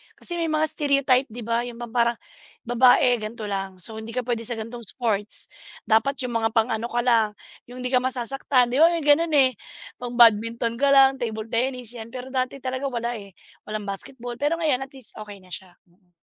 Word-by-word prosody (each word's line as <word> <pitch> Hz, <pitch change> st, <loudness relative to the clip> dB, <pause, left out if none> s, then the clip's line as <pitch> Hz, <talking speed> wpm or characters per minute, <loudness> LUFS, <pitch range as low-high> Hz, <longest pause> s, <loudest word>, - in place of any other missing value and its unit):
kasi 345 Hz, -1 st, -3 dB
may 330 Hz, -, 0 dB
mga 310 Hz, 0 st, +1 dB
stereotype 280 Hz, -4 st, +2 dB
di 235 Hz, +1 st, -8 dB
ba, 230 Hz, +2 st, -1 dB
yung 240 Hz, -, -8 dB, 0.2 s
parang 235 Hz, 0 st, +2 dB, 0.5 s
babae 245 Hz, 0 st, +4 dB
ganito 215 Hz, +1 st, -6 dB
lang. 195 Hz, -2 st, -4 dB
So 220 Hz, +3 st, -6 dB
hindi 225 Hz, +1 st, -8 dB
ka 250 Hz, -, -1 dB
pwede 230 Hz, -2 st, -2 dB
sa 240 Hz, -, -1 dB
ganitong 230 Hz, +1 st, -7 dB
sports. 210 Hz, -1 st, 0 dB, 0.3 s
Dapat 230 Hz, +5 st, +2 dB
yung 240 Hz, -2 st, -1 dB
mga 225 Hz, -, +2 dB
pang-ano 225 Hz, 0 st, +1 dB
ka 240 Hz, 0 st, -1 dB
lang, 225 Hz, -4 st, +2 dB, 0.3 s
yung 250 Hz, +1 st, -9 dB
hindi 250 Hz, -, -1 dB
ka 250 Hz, -, +4 dB
masasaktan 255 Hz, 0 st, 0 dB
di 260 Hz, -, +1 dB
ba? 325 Hz, -, +8 dB
May 335 Hz, -2 st, -1 dB
ganun, 310 Hz, +3 st, +4 dB
eh. 260 Hz, -6 st, +4 dB, 0.4 s
Pang 245 Hz, -1 st, -6 dB
badminton 230 Hz, 0 st, +4 dB
ka 280 Hz, -, +3 dB
lang, 270 Hz, -1 st, +6 dB
table 220 Hz, -2 st, -4 dB
tennis, 250 Hz, 0 st, -1 dB
yan. 225 Hz, -2 st, -8 dB
Pero 255 Hz, +1 st, -7 dB
dati 260 Hz, +1 st, -2 dB
talaga 260 Hz, +2 st, -2 dB
wala, 240 Hz, -2 st, -2 dB
eh, 200 Hz, -2 st, -13 dB, 0.3 s
walang 215 Hz, 0 st, -4 dB
basketball, 240 Hz, +4 st, -6 dB
pero 295 Hz, +3 st, +1 dB
ngayon 280 Hz, -5 st, 0 dB
at 270 Hz, -, -32 dB
least 260 Hz, -4 st, -1 dB
okey 210 Hz, -1 st, -8 dB
na 180 Hz, -, -18 dB
siya 180 Hz, -1 st, -8 dB
mm. 175 Hz, 0 st, -33 dB
240 Hz, 205 wpm, -24 LUFS, 225-265 Hz, 0.5 s, ba